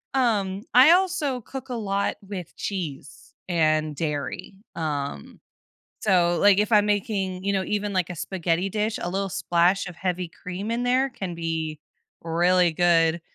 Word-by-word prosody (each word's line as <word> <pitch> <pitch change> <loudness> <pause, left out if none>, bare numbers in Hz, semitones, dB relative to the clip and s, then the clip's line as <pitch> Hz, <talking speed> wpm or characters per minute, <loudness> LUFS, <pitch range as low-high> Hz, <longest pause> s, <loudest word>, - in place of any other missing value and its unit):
Um, 205 -6 +1
I 255 +5 +8
also 345 -8 +2
cook 265 +3 -8
a 250 - -3
lot 200 -3 -1
with 185 -4 -7
cheese 155 -9 -6
and 155 -3 +1
dairy, 150 +2 -4 0.2
um, 145 - -4 0.6
so, 175 -4 +3
like, 200 -1 +6
if 210 +2 +1
I'm 210 -1 +5
making, 195 -3 -1
you 200 - +1
know, 190 -1 0
even 205 0 -2
like 185 -3 +1
a - - -4
spaghetti 175 +1 -1
dish, 215 +2 -1
a 175 - -2
little 195 +1 -1
splash 175 +3 +1
of 175 - -10
heavy 180 -2 -2
cream 185 +5 -6
in 235 +1 -1
there 255 +2 +2
can 190 -7 -5
be 160 -2 -3 0.4
really 175 +1 +3
good. 165 -1 +3
185 Hz, 155 wpm, -25 LUFS, 170-210 Hz, 0.6 s, I